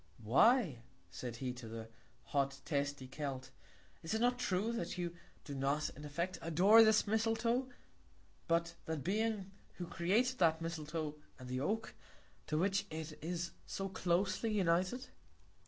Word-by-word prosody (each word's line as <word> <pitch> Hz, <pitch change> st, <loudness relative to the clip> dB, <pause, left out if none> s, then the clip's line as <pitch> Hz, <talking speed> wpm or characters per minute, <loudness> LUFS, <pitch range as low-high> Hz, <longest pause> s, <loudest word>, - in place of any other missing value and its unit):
Why 155 Hz, -, +4 dB, 0.3 s
said 120 Hz, -2 st, -5 dB
he 125 Hz, +1 st, -3 dB
to 125 Hz, -2 st, -9 dB
the 110 Hz, 0 st, -6 dB, 0.4 s
hot, 140 Hz, -1 st, 0 dB
testy 140 Hz, -3 st, -1 dB
Celt, 135 Hz, -1 st, -5 dB, 0.5 s
is 165 Hz, +6 st, -2 dB
it -, -, +1 dB
not 245 Hz, +1 st, +2 dB
true, 205 Hz, -1 st, +1 dB
that 180 Hz, -7 st, -3 dB
you 175 Hz, -1 st, -3 dB, 0.3 s
do 145 Hz, -, -7 dB
not 140 Hz, +2 st, 0 dB
in 150 Hz, -, -11 dB
effect 170 Hz, +5 st, -2 dB
adore 190 Hz, +8 st, +7 dB
this 220 Hz, 0 st, +5 dB
Misletoe, 225 Hz, +4 st, +1 dB, 0.8 s
but 170 Hz, 0 st, +2 dB
that 160 Hz, -4 st, -3 dB
Being 210 Hz, 0 st, 0 dB, 0.2 s
who 180 Hz, -, -5 dB
created 220 Hz, +11 st, +1 dB
that 160 Hz, -2 st, +4 dB
Misletoe 155 Hz, -2 st, -4 dB, 0.2 s
and 130 Hz, -, -9 dB
the 130 Hz, 0 st, -2 dB
Oak, 215 Hz, +11 st, -1 dB, 0.5 s
to 155 Hz, -, 0 dB
which 195 Hz, +3 st, +1 dB
it 155 Hz, -1 st, -5 dB
is 175 Hz, +1 st, -2 dB, 0.2 s
so 195 Hz, 0 st, -3 dB
closely 190 Hz, +4 st, +1 dB
united? 185 Hz, +5 st, +1 dB
170 Hz, 145 wpm, -36 LUFS, 145-210 Hz, 0.8 s, adore